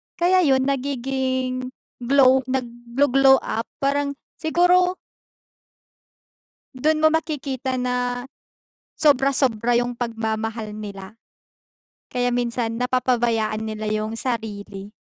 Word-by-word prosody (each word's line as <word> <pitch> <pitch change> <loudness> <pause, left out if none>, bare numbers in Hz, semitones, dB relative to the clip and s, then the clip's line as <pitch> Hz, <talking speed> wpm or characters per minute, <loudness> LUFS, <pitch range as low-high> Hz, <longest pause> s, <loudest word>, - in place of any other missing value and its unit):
kaya 365 +2 +3
yun 265 -3 +3
nagiging 260 -1 -2 0.3
glow, 265 +1 +5
nagglo-glow 260 +2 +2
up 225 +1 -3 0.2
parang 280 0 0 0.2
siguro 355 +3 +3 1.8
Dun 310 +4 +1
mo 315 - +6
makikita 280 -5 -2
na 250 -1 -1 0.7
sobra-sobra 265 -5 +2
yung 245 0 -4
pagmamahal 225 -2 -3
nila, 200 0 -9 0.9
kaya 245 0 -1
minsan 235 -1 -1
napapabayaan 240 -4 +1
nila 215 0 -4
yung 215 +1 -2
sarili. 210 -4 -5
250 Hz, 90 wpm, -22 LUFS, 225-275 Hz, 1.8 s, mo